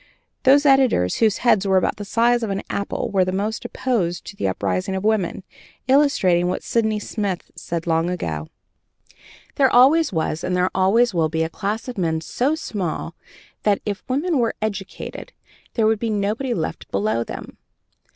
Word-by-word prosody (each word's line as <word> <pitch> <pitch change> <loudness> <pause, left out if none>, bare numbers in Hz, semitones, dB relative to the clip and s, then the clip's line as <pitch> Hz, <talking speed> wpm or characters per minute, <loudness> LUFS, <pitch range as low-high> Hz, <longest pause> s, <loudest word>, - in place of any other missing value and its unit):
Those 280 +3 +5
editors 260 - +4
whose 220 -3 +3
heads 200 -4 +4
were 190 -1 +4
about 185 - +1
the 205 - -6
size 235 +3 +2
of 225 - -2
an 195 0 -2
apple 200 - -3
were 195 -2 +3
the 185 - -1
most 205 +4 -2
opposed 180 -9 -2
to 205 - -9
the 100 - -1
uprising 185 - -1
of 190 - -3
women, 210 -4 0 0.4
illustrating 260 -11 +3
what 180 - -2
Sidney 220 -2 +1
Smith 205 -3 -4
said 165 -1 -4
long 165 0 +1
ago: 80 - -3 1.1
"There 270 -2 +5
always 280 +6 +5
was, 160 -1 -2
and 180 - -1
there 180 +1 +1
always 210 +5 +3
will 165 -3 +1
be 160 +1 0
a 160 - -2
class 210 +6 -3
of 245 -5 -5
men 160 -3 0
so 265 - 0
small 185 - -4 0.5
that, 205 -2 +2
if 205 -2 -3
women 295 +4 +1
were 230 -2 0
educated, 205 -3 -5 0.4
there 225 - +2
would 220 -1 +2
be 230 - -2
nobody 215 +5 -1
left 160 - -4
below 110 +4 0
them." - - -9
200 Hz, 175 wpm, -22 LUFS, 175-235 Hz, 1.1 s, Those